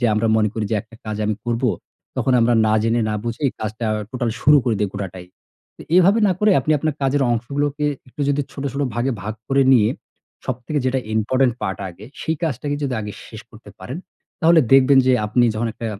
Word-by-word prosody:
যে, 120 - +3
আমরা 110 +2 +1
মনে 105 -1 +2
করি 110 - -2
যে - - +2
একটা 115 0 -19
কাজ 110 -1 -3
আমি 105 - 0
করব। 120 +1 -2 0.5
তখন 130 - +1
আমরা 120 +1 +3
না 110 - +3
জেনে, 115 +1 +1
না - - -1
বুঝেই 120 +4 -1
কাজটা 110 +1 -3 0.2
total 120 -2 -2
শুরু 150 - +6
করে 120 -4 +1
দেই, 105 - +1
গোটাটাই। 95 -3 -6 0.7
এভাবে 195 +5 +5
না - - +3
করে, 210 0 +4
আপনি 155 - 0
আপনার 155 0 -1
কাজের 135 +1 +2
অংশগুলোকে 145 +5 -2 0.2
একটু 145 - -11
যদি 145 0 +1
ছোট, 140 - -6
ছোট 140 - -2
ভাগে 125 +3 0
ভাগ 110 +1 -4
করে 135 0 +3
নিয়ে 110 -4 +5 0.6
সবথেকে 130 +4 -3
যেটা 130 +1 +1 0.2
important 125 +4 +2
part 95 -3 -2
আগে, 90 +3 -12 0.2
সেই 160 0 -1
কাজটাকে 145 -2 -2
যদি 135 -3 -1
আগে 105 -1 -6
শেষ 110 - -10
করতে 110 +2 -14
পারেন, 135 +7 -7 0.4
তাহলে 165 -1 +6
দেখবেন 135 0 +6
যে, 130 - +5
আপনি 120 +3 +2
যখন 115 +2 -1
একটা 115 - -6
125 Hz, 205 wpm, -21 LUFS, 110-140 Hz, 0.7 s, শুরু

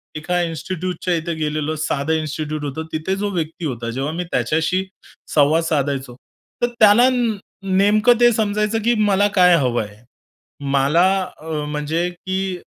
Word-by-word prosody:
एका 175 +3 -1
इन्स्टिट्यूटच्या 175 +2 -3
इथे 165 +1 -2
गेलेलो, 155 0 -2
साधं 155 0 -1
इन्स्टिट्यूट 155 -1 -3
होतं. 160 +3 -4
तिथे 160 +5 -1
जो 205 +1 -2
व्यक्ती 165 -1 -4
होता, 120 -4 -4
जेव्हा 135 +5 -3
मी 180 +1 -3
त्याच्याशी 160 +9 0 0.5
संवाद 155 +3 +4
साधायचो, 140 -5 -1 0.5
तर - - +4
त्यांना 220 +4 +6 0.7
नेमकं 215 +4 +4
ते 240 0 +7
समजायचं, 210 +1 0
की 240 - +4 0.2
मला 200 +1 +3
काय 180 -1 +7
हवं 120 -5 0
आहे. 105 +3 -13 0.7
मला 140 +6 +3 0.4
म्हणजे 155 +2 -2
की 190 +1 -3
160 Hz, 135 wpm, -20 LUFS, 150-190 Hz, 0.7 s, ते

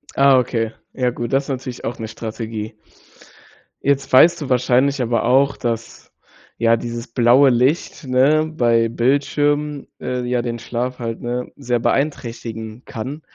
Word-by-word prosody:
Ah, 135 -1 +6
okay, 115 -2 -1 0.2
ja, 125 -1 0
gut. 120 +1 -5
Das 135 +1 +3
ist - - -11
natürlich 130 -2 -5
auch 120 - -3
'ne 110 - -4
Strategie. 110 -1 -6 1.1
Jetzt 140 -1 0
weißt 170 +6 +6
du 140 - -5
wahrscheinlich 130 +2 +2
aber 115 -2 0
auch, 135 +3 +3
dass, 115 -1 -5 0.5
ja, 115 0 +4
dieses 120 +1 -5
blaue 120 +4 +5
Licht, 130 +8 +1
ne, 135 +5 +3
bei 120 -7 +1
Bildschirmen, 145 +4 0
äh, 125 0 -2
ja, 125 0 0
den 120 -1 -4
Schlaf 125 +2 -4
halt, 115 -1 -4
ne, 125 +1 -3
sehr 125 -3 -1
beeinträchtigen 115 -4 -3
kann. 130 +7 -6
125 Hz, 150 wpm, -20 LUFS, 115-135 Hz, 1.1 s, Ah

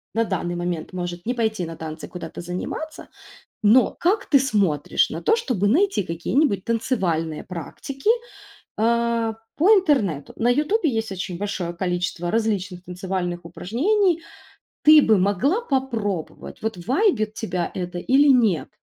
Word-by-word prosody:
на 230 - +3
данный 175 -4 -2
момент 175 -1 -4
может 175 -1 -5
не 245 - 0
пойти 220 -6 -1
на 165 0 -7
танцы 155 0 -7
куда-то 180 - -8
заниматься. 180 - -6 0.6
Но 230 +5 +5
как 395 +4 +1
ты 280 - +6
смотришь 200 - +1
на - - -5
то, - - +1
чтобы 245 - 0
найти 365 - +2
какие-нибудь 190 - 0
танцевальные 180 - -1
практики, 270 - -5 0.7
э, 230 0 +1 0.2
по 335 +6 +3
интернету? 270 - +2
На 235 - +1
"Ютубе" 305 - +2
есть 225 -3 -2
очень 180 -2 -5
большое 190 -3 -3
количество 175 -1 -2
различных 200 -5 -1
танцевальных 180 -1 -3
упражнений. 330 - 0 0.6
Ты 305 0 +8
бы 220 -2 +5
могла 205 - +2
попробовать, 235 - -3
вот 220 -2 -2
вайбит 250 - +1
тебя 180 -6 -3
это 180 -1 -4
или 270 +10 +4
нет? 225 - +3
215 Hz, 135 wpm, -23 LUFS, 180-265 Hz, 0.7 s, Ты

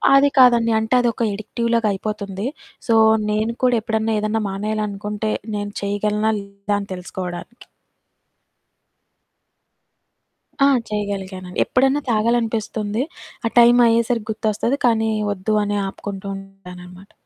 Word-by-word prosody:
అది 280 +1 +6
కాదండి. 235 -2 +6
అంటే 220 +2 -2
అది 245 - +2
ఒక 235 - -2
అడిక్టివ్‌ 230 +3 -3
లాగా 230 -2 +2
అయిపోతుంది. 200 0 -4 0.4
సో, 230 - +3 0.3
నేను 215 +2 0
కూడా 250 -1 +4
ఎప్పుడన్నా 220 0 -1
ఏదన్నా 215 +1 -1
మానేయాలనుకుంటే 210 +1 -3 0.2
నేను 205 0 -3
చేయగలనా? 210 +2 0
లేదా? 200 +1 -4
అని 200 - -7
తెలుసుకోవడానికి. 180 +4 -7 3.0
ఆ! - - +6 0.2
చేయగలిగాను. 195 -3 -4
ఎప్పుడన్నా 270 +3 +2
తాగాలనిపిస్తుంది. 225 -1 0 0.4
ఆ 230 - +2
టైం 240 +1 +7
అయ్యేసరికి 230 -1 +1
గుర్తొస్తది 220 +5 -1
కానీ, 225 -2 +2 0.2
వద్దు 200 +2 -2
అని 205 0 -1
ఆపుకుంటుంటాననమాట. 195 -2 -9
215 Hz, 110 wpm, -21 LUFS, 200-230 Hz, 3.0 s, టైం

